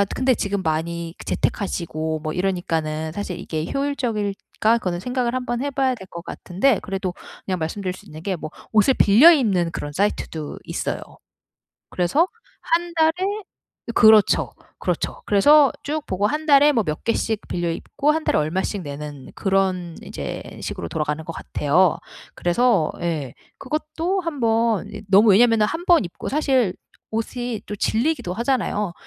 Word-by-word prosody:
근데 260 -1 +2
지금 200 -1 -2
많이 165 +1 -2
재택 - - -1
하시고 160 -4 -3
뭐 155 0 -4
이러니까는 160 -4 -1
사실 185 0 -5
이게 155 -1 -3
효율적일까? 230 -5 0
그거는 180 -6 -3
생각을 245 +3 -1
한번 250 -1 -2
해 285 - -2
봐야 265 -2 +1
될 190 -5 -11
것 170 - -7
같은데 200 +10 0
그래도 190 -2 -3 0.3
그냥 185 -1 -1
말씀 165 +5 -3
드릴 185 -2 -2
수 185 - -14
있는 155 +1 -10
게 190 +1 -2
뭐 155 -2 -7 0.2
옷을 220 +4 +4
빌려 245 +10 +7
입는 200 - +2
그런 145 - -5
사이트도 160 -3 -2
있어요. - - -3 0.9
그래서 230 - +2 0.3
1 340 +1 0
달에 320 -1 +4 0.8
그렇죠. 220 -2 +5 0.3
그렇죠. - - -2
그래서 285 +8 +5
쭉 300 +1 -3
보고 190 +2 0
1 300 +8 -2
달에 290 -1 +6
뭐 225 -7 +1
몇 155 -1 -3
개씩 225 -2 0
빌려 175 -1 -1
입고 280 - -1
1 315 +1 +1
달에 - - +1
얼마씩 185 +6 -1
내는 145 -2 -8
그런 190 -4 0
이제 - - -6 0.2
식으로 85 - -4
돌아가는 150 0 -2
것 165 - -6
같아요. 165 +3 +1 0.4
그래서 175 -2 +2
예. 155 -7 -2 0.3
그것도 320 +5 -2
한번 230 - 0 0.2
너무 205 +3 +6
왜냐면은 225 +2 +5
1 325 +11 -3
번 345 - +5
입고 170 - -7
사실 265 -9 +1 0.4
옷이 230 0 -3
또 210 - -5
질리기도 225 - 0
하잖아요. 220 -5 0
205 Hz, 310 characters per minute, -22 LUFS, 170-255 Hz, 0.9 s, 빌려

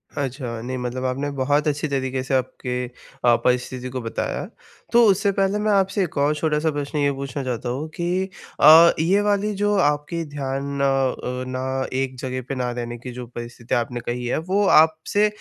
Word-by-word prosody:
अच्छा, 125 -4 -4
नहीं 130 +2 -4
मतलब 125 +1 -3
आपने 135 +3 -1
बहुत 145 +3 +1
अच्छी 150 +1 0
तरीक़े 130 -2 -2
से 135 - -4
आपके 125 -1 -2
अ, 120 -1 0
परिस्थिति 125 0 0
को 130 0 -4
बताया। 115 -1 -3 0.5
तो 240 0 +7
उससे 200 +1 +3
पहले 195 +1 +1
मैं 210 0 +1
आपसे 195 0 +2
एक 170 - -5
और 145 +2 +2
छोटा-सा 155 +1 0
प्रश्न 145 0 -4
ये 145 -1 +2
पूछना 135 0 -5
चाहता 125 -1 -3
हूँ 140 +6 -3
कि 180 +2 -1 0.3
अ, 165 +3 +9
ये 185 +6 +3
वाली 205 0 +1
जो 205 0 +3
आपकी 150 0 +1
ध्यान 140 0 -3
अ - - +3
अ, 130 -2 0
ना 130 +1 -2 0.2
एक 130 -1 -3
जगह 130 0 -3
पे 135 - -2
ना 125 -1 -1
रहने 120 0 -5
की 125 +2 -8
जो 125 0 -7
परिस्थिति 120 0 -5
आपने 120 +1 -1
कही 120 +1 -3
हैं, - - 0
वो 190 +5 +1
आपसे 160 +7 +4
135 Hz, 190 wpm, -22 LUFS, 125-160 Hz, 0.5 s, अ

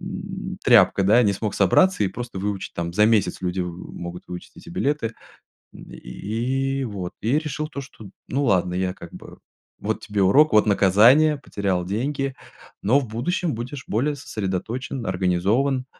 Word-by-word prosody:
м, - - -6
тряпка, 100 - +5
да, 115 +5 +5
не 100 -2 +3
смог 105 +1 -3
собраться 145 - +3
и - - +1
просто 120 0 -7
выучить, 100 0 -3
там 85 0 -3
за 105 +4 +4
месяц 110 -3 +1
люди 90 0 -2
в 90 0 -6
могут 85 0 -7
выучить 90 0 -8
эти - - -13
билеты." 150 -9 -1 0.6
М, - - -13
и - - -10 0.8
и - - -1
вот 95 -5 -5
и 120 +8 +2
решил 155 0 -4
то, 145 -2 -7
что: 110 -7 -12 0.2
"Ну 140 +2 -1
ладно, 90 -4 +2
я 90 0 -1
как 85 -3 -12
бы, - - -11 0.4
вот - - -2
тебе 105 -1 -2
урок, 140 +9 +5
вот 105 - +5
наказание, 115 +10 +5
потерял 100 -8 -2
деньги, 135 +6 -2 0.5
но 125 +8 +4
в 130 - -5
будущем 160 +9 -2
будешь 125 +3 -6
более 140 +7 0
сосредоточен, 115 +2 -4
организован. 100 +9 +1
110 Hz, 170 wpm, -23 LUFS, 95-135 Hz, 0.8 s, тряпка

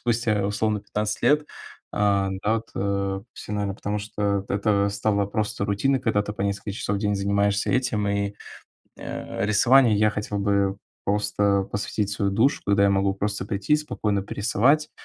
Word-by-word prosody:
спустя 115 -4 +1
условно 105 0 0
15 105 +1 -3
лет? 150 +5 +3 0.5
А, 100 -2 +2
да, 110 +2 +2
вот, 115 0 -4
э, 100 0 -1
всё, - - -8
наверно, 100 -2 -1
потому, 105 +1 -3
что 100 -1 -2
это 100 0 +1
стало 100 0 0
просто 105 0 -2
рутиной, 110 +7 +1
когда 110 -4 +1
ты 105 - -5
по 105 - -10
несколько 100 +1 -2
часов 100 0 -2
в - - -2
день 105 -1 +1
занимаешься 100 +1 +1
этим. 125 -5 0
И, 100 0 -1 0.6
э, 95 - -4
рисованию 115 +2 +5
я 105 +1 +4
хотел 105 0 -3
бы 100 -1 +1 0.3
просто 100 -1 +1
посвятить 105 0 -2
свою 100 -1 0
душу, 115 +8 +2
когда 100 0 +3
я 100 - +5
могу 95 0 +2
просто 100 0 -3
прийти 105 +8 +1
спокойно 105 -9 -1
порисовать, 125 +10 +1
105 Hz, 170 wpm, -24 LUFS, 100-110 Hz, 0.6 s, рисованию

